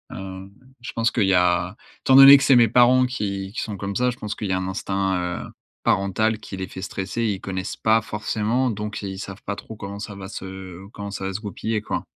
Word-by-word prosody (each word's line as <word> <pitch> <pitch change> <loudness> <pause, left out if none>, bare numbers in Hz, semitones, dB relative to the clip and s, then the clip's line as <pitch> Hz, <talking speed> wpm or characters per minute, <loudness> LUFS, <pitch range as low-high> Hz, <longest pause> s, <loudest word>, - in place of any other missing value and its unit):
hem, 95 0 -8 0.3
je 120 - -6
pense 115 0 +1
qu'il 110 - +1
y 95 - +3
a 90 +1 +2 0.3
étant 130 - +4
donné 135 +1 +11
que 140 - -1
c'est 135 - +5
mes 120 -1 +6
parents 125 +3 +5
qui 100 -5 -3
qui - - -3
sont 105 -2 -5
comme 100 +1 -4
ça, 125 0 +2
je 120 - -10
pense 105 0 -4
qu'il 105 - -4
y - - 0
a 95 - +1
un 95 0 -3
instinct, 95 0 -1 0.3
heu, - - -11 0.3
parental 110 +3 +1
qui 95 -3 -8
les 95 -1 -4
fait 95 - -9
stresser. 100 +4 -3
Ils 100 -4 -1
connaissent 95 0 -4
pas 110 +1 +3
forcément 110 +3 -1
donc 105 0 -5
ils 95 -1 -5
savent 95 0 -8
pas 105 - -2
trop 110 +2 -10
comment 100 -1 -7
ça 105 -1 -7
va 95 -1 -8
se 95 -1 -8
comment 100 -1 -6
ça 95 - -5
va 95 - -3
se 95 - -3
goupiller, 110 +1 -3
quoi. - - -4
100 Hz, 240 wpm, -23 LUFS, 95-110 Hz, 0.3 s, donné